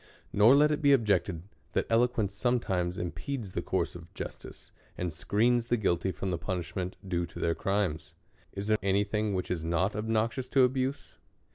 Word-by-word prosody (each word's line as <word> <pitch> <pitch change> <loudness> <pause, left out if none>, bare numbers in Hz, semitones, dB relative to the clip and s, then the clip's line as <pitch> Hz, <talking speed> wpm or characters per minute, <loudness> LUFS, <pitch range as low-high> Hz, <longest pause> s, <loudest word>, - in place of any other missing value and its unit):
Nor 110 +6 +7
let 150 +1 +5
it 150 - -1
be 140 -1 +6
objected, 100 -8 +1 0.3
that - - +1
eloquence 115 -3 +2
sometimes 100 -6 0
im 90 -1 -2
pedes 125 -9 -5
the - - -2
course - - -1
of - - -11
justice, - - -8 0.3
and 90 -3 -2
screens 115 +8 +1
the 120 - +2
guilty 95 -3 +1
fi'om 95 +3 -3
the 85 - -2
punishment 90 +1 -3
due 85 -2 -1
to - - -13
their 85 - +1
crimes. 90 -5 -2 0.4
Is 100 0 -5
there 110 0 +3
any 100 +1 +2
thing 105 -1 -1
which 90 - -3
is 85 -3 -2
not 85 +5 0
obnoxious 115 +4 -1
to 135 -1 +5
abuse? 130 +2 -1
100 Hz, 180 wpm, -29 LUFS, 90-120 Hz, 0.4 s, Nor